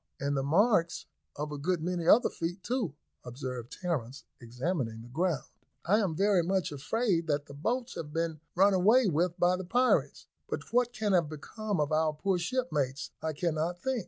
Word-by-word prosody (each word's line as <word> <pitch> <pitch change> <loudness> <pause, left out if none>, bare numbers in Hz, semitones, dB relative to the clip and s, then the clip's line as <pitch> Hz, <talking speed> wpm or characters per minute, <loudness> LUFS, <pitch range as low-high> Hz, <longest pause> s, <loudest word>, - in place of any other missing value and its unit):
"And 140 +1 -1
the 135 - +1
marks 170 - +2 0.3
of 150 +1 -4
a 145 - -5
good 175 +4 0
many 175 -1 -2
other 240 +7 +6
feet 175 +3 -4
too," 235 - -2 0.3
observed 125 -1 -6
Terence, 140 -8 -3 0.2
examining 120 -1 -3
the 120 - -12
ground. 165 +3 0 0.4
"I 205 +5 +4
am 190 -7 0
very 195 +1 +3
much 185 -1 0
afraid 170 - 0
that 145 -1 0
the 140 - -11
boats 235 - -2
have 150 -2 -6
been 165 -1 -2 0.2
run 195 +3 +5
away 215 +7 +5
with 175 0 +1
by 180 +1 +3
the 185 - -5
pirates; 245 +8 +1 0.2
but - - -3
what 245 0 +3
can 215 -4 -1
have 170 -5 +3
become 200 +6 -4
of 150 0 0
our 155 0 +2
poor 185 +4 0
shipmates, 155 - -1
I 160 0 -2
cannot 170 +2 -1
think." 265 -2 0
170 Hz, 185 wpm, -30 LUFS, 145-195 Hz, 0.4 s, other